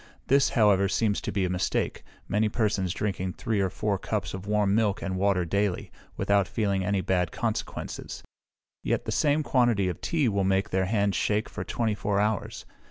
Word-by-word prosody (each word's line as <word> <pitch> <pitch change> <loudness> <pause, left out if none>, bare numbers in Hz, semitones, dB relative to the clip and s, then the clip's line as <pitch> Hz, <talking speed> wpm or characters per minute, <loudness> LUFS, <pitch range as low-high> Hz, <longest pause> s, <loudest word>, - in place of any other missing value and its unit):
This, 140 +1 +4
however, 100 -3 +4
seems 105 +1 +1
to - - -3
be 95 -1 0
a - - -1
mistake, 90 0 -1 0.2
many 105 +2 +1
persons 100 -5 0
drinking 95 -2 -2
three 110 -2 -2
or 95 -1 +1
four 100 +1 -1
cups 100 -4 -3
of 95 +1 -7
warm 105 -1 +2
milk 105 -2 +1
and 95 -1 -2
water 95 -1 +1
daily, 100 +1 -1 0.3
without 100 -1 +2
feeling 100 -4 0
any 100 0 0
bad 90 -3 0
consequences; - - -4 0.6
yet - - -1
the - - -2
same 150 +1 +2
quantity 120 -9 +2
of 90 - -6
tea 155 -6 +1
will 100 -3 +1
make 95 +1 +1
their 95 0 +1
hands 100 0 +1
shake 105 +1 0
for - - -6
twenty 115 -3 -1
four 105 0 -1
hours. 105 0 -1
100 Hz, 185 wpm, -27 LUFS, 95-105 Hz, 0.6 s, This